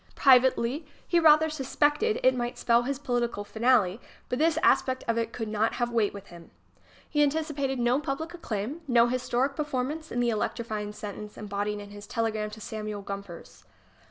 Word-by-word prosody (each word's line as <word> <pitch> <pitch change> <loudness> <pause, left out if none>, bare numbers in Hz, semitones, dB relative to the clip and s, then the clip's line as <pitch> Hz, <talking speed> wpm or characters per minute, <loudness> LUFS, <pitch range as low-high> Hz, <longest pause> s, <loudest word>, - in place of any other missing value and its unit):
Privately 260 +2 +4 0.2
he 345 - +3
rather 315 -1 +6
suspected 300 - +1
it 260 - +6
might 240 -1 -3
spell 235 0 +3
his 270 +3 -2
political 240 -6 -1
finale, 220 -2 +2 0.3
but 250 - -1
this 320 0 +3
aspect 260 -1 +3
of 230 - +1
it 230 0 -1
could 225 -2 -4
not 215 +1 0
have 240 0 -1
weight 225 -3 +2
with 200 -1 -10
him. 170 -1 -13 0.6
He 295 - +1
anticipated 290 -2 0
no 245 +2 +2
public 300 +4 -4
acclaim, 270 - -4
no 235 -2 +5
historic 255 +2 0
per 300 - -1
manence 295 +3 -3
in 245 - -2
the 240 -1 +2
electrifying 215 -1 -3
sentence 210 0 -8
embodied 205 0 -3
in 205 0 -10
his 205 0 -10
telegram 220 -2 -1
to 215 +1 -10
Samuel 215 -1 -5
Gompers 200 -3 -8
240 Hz, 175 wpm, -28 LUFS, 215-280 Hz, 0.6 s, rather